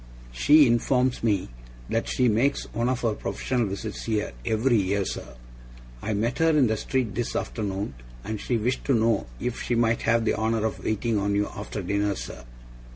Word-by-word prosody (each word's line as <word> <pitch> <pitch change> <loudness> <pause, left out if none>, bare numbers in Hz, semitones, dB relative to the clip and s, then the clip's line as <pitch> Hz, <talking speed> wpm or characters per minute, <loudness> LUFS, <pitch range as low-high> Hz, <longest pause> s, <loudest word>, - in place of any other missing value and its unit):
She 145 - +6
informs 125 +1 +2
me 100 -5 +1 0.4
that 115 - -1
she 125 - +2
makes 120 +6 +2
one 120 +1 0
of 130 -1 -1
her 115 -2 +1
professional 115 +4 -1
visits 100 +2 -5
here, 110 -2 -1
every 115 - +2
year, 100 0 +1
sir. - - -6 0.7
I 110 - -2
met 115 +4 -1
her 165 0 +4
in 150 -4 +4
the 110 -1 +1
street 125 -1 -1
this 120 -1 -2
afternoon, 100 - -3 0.3
and 110 0 -4
she 120 - 0
wished 120 +4 -1
to 135 - +3
know 115 - +2
if 125 -1 -3
she 120 - 0
might 115 0 +2
have 115 0 +2
the - - +2
honour 110 0 0
of 110 - -3
waiting 110 0 0
on 100 0 0
you 105 0 +1
after 105 0 -5
dinner, 100 +2 0
sir. 65 -7 -8
110 Hz, 190 wpm, -26 LUFS, 105-120 Hz, 0.7 s, She